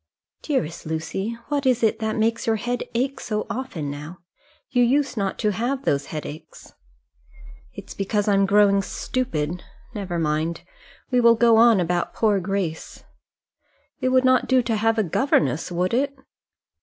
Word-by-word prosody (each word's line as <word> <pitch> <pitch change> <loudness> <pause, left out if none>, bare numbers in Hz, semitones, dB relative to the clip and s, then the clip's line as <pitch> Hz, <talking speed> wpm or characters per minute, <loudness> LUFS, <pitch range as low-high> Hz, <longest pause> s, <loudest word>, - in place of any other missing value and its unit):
"Dearest 170 - -2
Lucy, 175 +8 -3
what 290 -1 0
is 245 -2 +2
it 220 0 +2
makes 220 +1 0
your 225 - +3
head 245 +3 -2
ache 265 +3 -1
so 215 -1 -3
often 185 - -4
now? 150 +5 -8 0.5
you 245 - +2
used 270 +3 +2
not 195 -3 -2
to 210 - +1
have 255 +7 -2
those 140 0 0
headaches." 155 0 -8 1.0
"It's - - -9
because 205 +1 -1
I'm 195 -1 +3
growing 200 0 +4
stupid: 180 -9 -3 0.3
never 195 -5 -4
mind. 160 +1 -1 0.5
We 250 -1 +3
will 235 0 +6
go 230 -1 +4
on 230 -2 +6
about 175 0 -1
poor 210 -3 +2
Grace. 185 -3 -4 1.0
It 255 - 0
would 260 0 +3
not 255 -1 +3
do 260 -1 +3
to 230 -1 -1
have 225 +1 +1
a 220 - +3
governess, 165 - +1
would 180 +3 -1
it?" 275 +3 0
215 Hz, 155 wpm, -23 LUFS, 175-245 Hz, 1.0 s, will